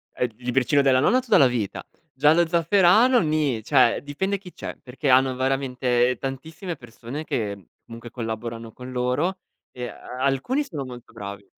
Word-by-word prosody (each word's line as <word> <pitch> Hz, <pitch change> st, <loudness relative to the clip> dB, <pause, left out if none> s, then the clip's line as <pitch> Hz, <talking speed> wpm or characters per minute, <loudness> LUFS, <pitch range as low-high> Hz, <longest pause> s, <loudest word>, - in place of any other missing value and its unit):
Eh -, -, 0 dB
il 115 Hz, -, -6 dB
libricino 135 Hz, +3 st, +2 dB
della 130 Hz, -2 st, +4 dB
nonna 220 Hz, -, +4 dB
tutta 225 Hz, -6 st, +3 dB
la 135 Hz, -, +7 dB
vita, 115 Hz, -5 st, -3 dB, 0.3 s
Giallo 150 Hz, +5 st, +4 dB
zafferano 190 Hz, +8 st, +4 dB
ni, 150 Hz, -, 0 dB
cioè 125 Hz, -2 st, +3 dB
dipende 190 Hz, +8 st, -2 dB
chi 185 Hz, -2 st, -13 dB
c'è, -, -, -7 dB
perché 135 Hz, +3 st, -3 dB
hanno 130 Hz, 0 st, +4 dB
veramente 125 Hz, -2 st, +1 dB
tantissime 160 Hz, +7 st, -5 dB
persone 120 Hz, +3 st, -8 dB
che 100 Hz, -, -3 dB, 0.2 s
comunque 115 Hz, 0 st, -10 dB
collaborano 115 Hz, -1 st, -5 dB
con 125 Hz, 0 st, -9 dB
loro, 130 Hz, +9 st, 0 dB, 0.3 s
ehm, 125 Hz, -1 st, -6 dB
e -, -, -5 dB
alcuni 135 Hz, -, -2 dB
sono 150 Hz, -, -6 dB
molto 125 Hz, -2 st, -11 dB
bravi. 100 Hz, 0 st, -8 dB
130 Hz, 160 wpm, -24 LUFS, 120-160 Hz, 0.3 s, la